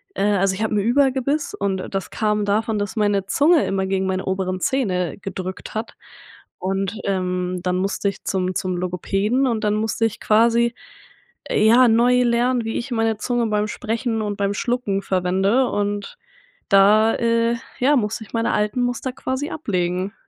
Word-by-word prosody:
äh 195 - -1
also 195 0 +2
ich 215 - -3
habe 220 -1 -1
'n - - +2
Überbiss 265 +5 +1
und 195 -2 -3
das 195 -1 -3
kam 210 -1 0
davon, 215 +1 0
dass 205 +2 -3
meine 205 -2 +1
Zunge 295 - +3
immer 190 0 -1
gegen 190 0 0
meine 190 0 -2
oberen 190 -1 -2
Zähne 185 - 0
gedrückt 190 -1 -6
hat 220 +2 -4 0.6
und, 195 +2 -2
ähm, 180 -1 -1
dann 180 0 0
musste 195 +2 -1
ich 195 - -9
zum 185 -1 -1
zum 185 -2 -2
Logopäden 195 +8 0
und 225 -2 -1
dann 210 - +2
musste 220 +1 0
ich 220 -1 -3
quasi, 235 +2 +3 0.7
äh, - - 0
ja, 245 +3 +6
neu 245 +2 +4
lernen, 240 +1 +1
wie 225 - -2
ich 250 +3 -5
meine 225 -2 0
Zunge 240 +1 -1
beim 210 0 0
Sprechen 225 0 -2
und 205 -1 -3
beim 200 0 0
Schlucken 210 -3 -1
verwende 190 +7 +1
und 205 - -3 0.5
da, 210 +2 +5
äh, 230 0 +1 0.2
ja 275 +4 +4
musste 220 0 -2
ich - - -20
meine 230 0 0
alten 210 +4 0
Muster 245 +1 -2
quasi 260 +3 -3
ablegen. 185 - -2
210 Hz, 170 wpm, -21 LUFS, 195-235 Hz, 0.7 s, ja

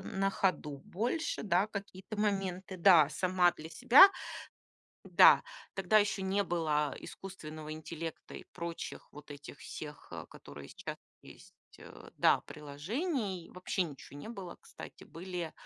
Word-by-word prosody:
на 195 0 -1
ходу 160 -7 -1
больше, 235 - -2
да, 190 -1 +2
какие-то 200 -1 -7
моменты. 195 -3 -1
Да, 170 -5 +7
сама 180 +2 +3
для 160 0 -10
себя 250 - +8 1.0
Да, - - +7 0.3
тогда 195 +2 +4
еще 210 -1 +1
не 195 +2 +1
было, 155 -6 0
э, - - -11
искусственного 155 -5 -8
интеллекта 160 +1 -7
и - - -8
прочих 170 -1 -6
вот 150 0 -13
этих 145 0 -10
всех, 150 -1 -9
э, - - -7
которые 70 0 -11
сейчас - - -7 0.2
есть - - -15 0.2
э, - - -13
да, - - +4
приложений. 190 - -4
Вообще 185 +1 -1
ничего 145 -4 -9
не 145 - -8
было, 195 -6 -8
кстати, - - -11
были 175 -1 -6
180 Hz, 140 wpm, -32 LUFS, 155-195 Hz, 1.0 s, себя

